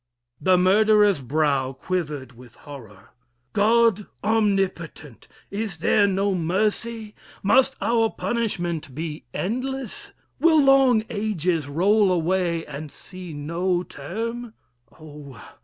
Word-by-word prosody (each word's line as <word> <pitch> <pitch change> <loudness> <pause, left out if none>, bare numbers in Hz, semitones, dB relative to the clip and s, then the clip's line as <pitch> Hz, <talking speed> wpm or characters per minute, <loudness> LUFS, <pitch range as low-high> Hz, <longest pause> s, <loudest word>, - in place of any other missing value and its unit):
The 185 -1 +4
murderer's 205 -1 +4
brow 140 -1 0
Quivered 150 -4 -4
with 120 -1 -16
horror. 115 -10 -13 0.4
God 220 -1 +3 0.2
omnipotent! 195 - -1 0.2
Is 200 -3 -4
there 200 +5 +3
no 195 +1 0
mercy? 210 +5 -1 0.3
must 265 +7 +4
our 230 -1 +2
punishment 175 - -3
Be 155 0 -5
endless? 255 +5 -4 0.3
will 325 -2 +5
long 270 -5 +5
ages 180 -7 -1
roll 195 +7 +3
away, 175 -1 0
And 150 +1 -7
see 185 -2 -10
no 170 +5 -1
'term? 225 - -6 0.4
Oh! 145 -6 -12
185 Hz, 105 wpm, -23 LUFS, 155-220 Hz, 0.4 s, will